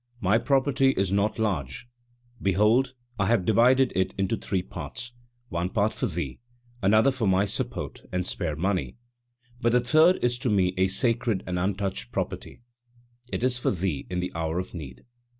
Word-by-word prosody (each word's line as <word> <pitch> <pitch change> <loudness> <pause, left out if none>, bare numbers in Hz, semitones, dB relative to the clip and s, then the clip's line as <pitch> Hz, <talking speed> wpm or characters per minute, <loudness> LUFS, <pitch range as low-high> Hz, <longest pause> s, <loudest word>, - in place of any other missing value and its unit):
My 100 +3 +3
property 135 0 +2
is 95 -1 +1
not 100 +2 +1
large; 95 - -2 0.5
behold 110 +7 +3 0.2
I 95 - +2
have 110 -5 +2
divided 125 +5 +4
it 95 0 0
into 95 +3 0
three 95 -4 -2
parts, 120 +6 -7 0.4
one 85 +1 -2
part 105 0 +1
for 125 - -2
thee, 80 - -4 0.4
another 110 +7 +4
for 130 -5 -1
my 95 +1 +3
support 100 - -4
and 90 -1 -1
spare 85 -5 -2
money, 95 +6 -1 0.6
but 120 -1 +2
the 125 - +5
third 155 +9 +5
is 120 0 +1
to 125 - -1
me 95 -3 +2
a 95 0 +3
sacred 115 0 0
and 90 -1 -2
untouched 95 -9 -2
property, - - -4 0.7
it - - -2
is 125 -1 +2
for - - +1
thee 90 -5 -2
in 90 -1 -2
the 90 - -3
hour 80 0 -2
of 90 +1 -4
need." 65 -8 -9
100 Hz, 170 wpm, -26 LUFS, 90-120 Hz, 0.7 s, the